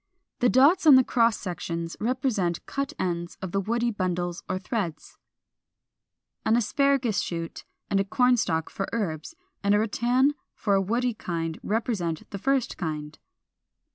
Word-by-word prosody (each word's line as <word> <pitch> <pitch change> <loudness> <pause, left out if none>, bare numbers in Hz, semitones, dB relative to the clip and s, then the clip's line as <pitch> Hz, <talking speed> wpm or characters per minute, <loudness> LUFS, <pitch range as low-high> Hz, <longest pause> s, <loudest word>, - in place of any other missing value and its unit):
The 245 - +4
dots 300 +9 +5
on 290 - +10
the 260 - +7
cross 230 -2 +2
sections 170 -2 -4
represent 225 -7 -1
cut 275 0 -3
ends 175 -2 -3
of 190 -2 -5
the 195 - +1
woody 235 +4 0
bundles 180 -3 -2
or 185 - 0
threads.] 185 -5 -4 1.3
426. - - -43
An 220 - +4
Asparagus 255 -2 +2
shoot 165 -1 -5 0.2
and 195 - +1
a - - +3
Corn 250 +5 +3
stalk 160 -8 -1
for 195 - -3
herbs, 195 - -3 0.3
and 200 +1 +4
a - - +3
rattan 245 +6 +2 0.2
for 205 - 0
a 195 - +4
woody 240 +5 0
kind, 165 -5 -4
represent 205 -7 -2
the 200 - -5
first 265 +2 0
kind. 155 -3 -5
205 Hz, 155 wpm, -26 LUFS, 175-245 Hz, 1.3 s, on